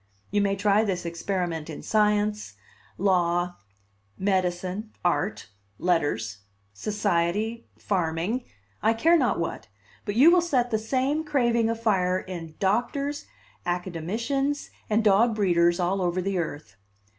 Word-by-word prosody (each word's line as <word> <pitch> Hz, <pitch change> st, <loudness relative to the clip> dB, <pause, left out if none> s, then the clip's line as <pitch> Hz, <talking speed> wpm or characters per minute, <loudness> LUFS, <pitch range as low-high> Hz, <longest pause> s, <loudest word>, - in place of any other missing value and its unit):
You 205 Hz, 0 st, +2 dB
may 200 Hz, -1 st, +1 dB
try 205 Hz, +2 st, +3 dB
this 185 Hz, -5 st, -2 dB
experiment 170 Hz, -2 st, -3 dB
in 155 Hz, -, -7 dB
science, 210 Hz, 0 st, +1 dB, 0.4 s
law, 175 Hz, -2 st, +1 dB, 0.6 s
medicine, 185 Hz, +2 st, -1 dB
art, 180 Hz, -, 0 dB, 0.3 s
letters, 130 Hz, -, 0 dB, 0.3 s
society, 205 Hz, -, -1 dB
farming, 185 Hz, +6 st, -1 dB, 0.4 s
I 220 Hz, +1 st, +3 dB
care 325 Hz, +9 st, +4 dB
not 335 Hz, -, +2 dB
what, -, -, -4 dB, 0.4 s
but 205 Hz, -2 st, -3 dB
you 285 Hz, +8 st, +7 dB
will 355 Hz, 0 st, +5 dB
set 255 Hz, -8 st, 0 dB
the 220 Hz, -, +1 dB
same 265 Hz, +7 st, 0 dB
craving 240 Hz, -6 st, +2 dB
afire 200 Hz, -6 st, +1 dB
in 170 Hz, -4 st, -7 dB
doctors, 245 Hz, +8 st, -1 dB, 0.4 s
academicians, 220 Hz, -, -2 dB, 0.2 s
and 220 Hz, +1 st, +2 dB
dog 220 Hz, +2 st, +4 dB
breeders 175 Hz, -3 st, +3 dB
all 185 Hz, +2 st, 0 dB
over 180 Hz, 0 st, 0 dB
the 190 Hz, 0 st, -1 dB
earth. 145 Hz, -, -5 dB
200 Hz, 120 wpm, -26 LUFS, 175-225 Hz, 0.6 s, you